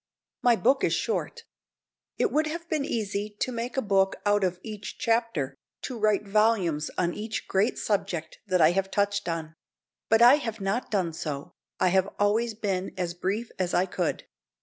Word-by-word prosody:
My 245 -1 +5
book 265 +4 +2
is - - +2
short. 470 - -2 0.7
It 435 - +1
would 305 +1 +2
have 330 +2 -5
been 310 -4 0
easy 205 -2 -2
to 255 - 0
make 235 +2 -4
a 265 - +1
book 195 -2 +2
out 205 -1 +3
of 180 -1 0
each 210 -3 -7
chapter, 225 - 0 0.3
to 255 - -4
write 215 -2 +1
volumes 195 -8 +2
on 175 -1 +1
each 215 +1 -4
great 195 +4 +1
subject 175 -6 -2
that 185 -2 +2
I 155 +1 +7
have 195 +1 0
touched 200 -1 0
on; 160 -1 -4 0.6
but 225 +1 +5
I 250 +4 +9
have 225 -6 -4
not 195 +5 -1
done 185 -6 0
so 145 -3 -5 0.3
I 185 - +4
have 190 +2 +2
always 215 +3 +1
been 195 -3 -2
as 175 -2 -2
brief 200 +6 -2
as 180 -1 0
I 180 - +3
could. 180 -2 -2
205 Hz, 180 wpm, -27 LUFS, 185-230 Hz, 0.7 s, I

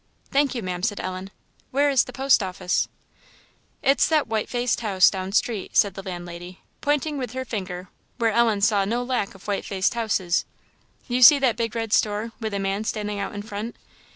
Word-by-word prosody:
"Thank 280 -1 +2
you, 235 - -3
Ma'am," 180 -1 -3
said 205 0 -1
Ellen; 185 +1 -5 0.4
"where 285 +2 +2
is 265 -3 +4
the - - -9
post 270 -3 +3
office?" 180 -1 -1 1.0
"It's 275 0 +4
that 310 -2 +2
white 220 -1 -2
faced 245 -1 0
house 195 -5 +4
down 190 -1 -4
street," 215 -1 0
said 200 -2 +4
the 195 - -7
landlady, 175 -1 -8 0.2
pointing 295 0 0
with 250 -2 -4
her 260 0 -4
finger 185 -5 -5 0.3
where 230 -2 +2
Ellen 225 -2 +2
saw 205 -1 +3
no 235 +5 -1
lack 245 -6 -2
of 195 - -14
white 200 -1 -1
faced 195 +1 0
houses; 205 -6 0 0.6
"you 250 -1 0
see 285 +4 +10
that 260 -4 +2
big 230 -1 -2
red 225 -2 -2
store, 210 +2 +1
with 220 -2 -3
the - - 0
man 195 +1 -1
standing 210 -2 -3
out 200 - -4
in 205 - -5
front? 210 +2 -6
215 Hz, 195 wpm, -24 LUFS, 195-245 Hz, 1.0 s, see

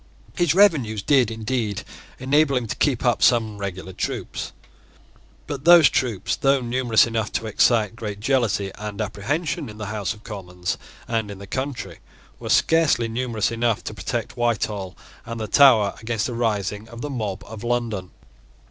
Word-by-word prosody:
His 175 -3 +2
revenues 135 - +3
did 130 -2 +4
indeed 110 -2 -2 0.3
enable 140 +2 +2
him 125 -2 0
to 110 - -4
keep 130 -3 0
up 120 - +2
some 110 -4 +3
regular 95 -1 -5
troops: - - -4 0.9
but 140 -2 -5
those 170 -4 +8
troops, 115 -7 0
though 135 0 +3
numerous 120 -2 +3
enough 115 -2 -2
to 115 - -2
excite 110 0 +2
great 105 -3 -5
jealousy 110 -5 +1
and 105 -1 -6
apprehension 130 - -2
in 105 - -10
the 110 - -5
House 105 -1 -2
of 105 - -18
Commons 90 -5 -5 0.3
and 115 -3 -1
in 100 - -7
the 100 - -9
country, 130 +5 -4 0.4
were - - -6
scarcely 160 -8 +3
numerous 115 -2 -1
enough 115 -1 0
to - - -5
protect - - -4
Whitehall 105 -5 -1 0.3
and 115 0 -6
the 110 - -2
Tower 115 -7 +6
against 110 -2 -1
a - - -4
rising 105 -2 -2
of 115 0 -9
the 145 - -4
mob 105 -7 -4
of 110 -1 -9
London. 115 -6 -2
115 Hz, 165 wpm, -23 LUFS, 105-130 Hz, 0.9 s, those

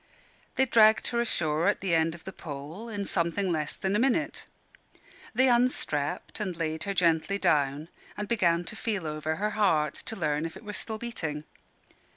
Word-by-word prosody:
They 265 - +3
dragged 220 -3 +5
her 235 - -1
ashore 160 -8 0
at - - +2
the 190 -3 0
end 160 0 +2
of 165 - -13
the 190 - -7
pole 155 +10 -7
in 205 -2 -3
something 175 +3 +1
less 155 -3 -1
than 190 +1 -1
a - - +3
minute. 270 +5 0 0.9
They 260 +3 +5
unstrapped 240 - +1
and 190 -5 -3
laid 160 +1 -2
her 200 - -1
gently 170 +2 +2
down, 150 -5 +1 0.3
and 210 0 -3
began 175 -7 +2
to 210 - -7
feel 210 -6 -2
over 155 +1 -2
her 210 +5 -1
heart, 155 -8 +2 0.2
to 225 - -4
learn 150 -5 0
if 165 - -10
it - - -14
were 210 - -5
still 220 +1 -2
beating. 160 -11 -4
180 Hz, 185 wpm, -28 LUFS, 155-215 Hz, 0.9 s, dragged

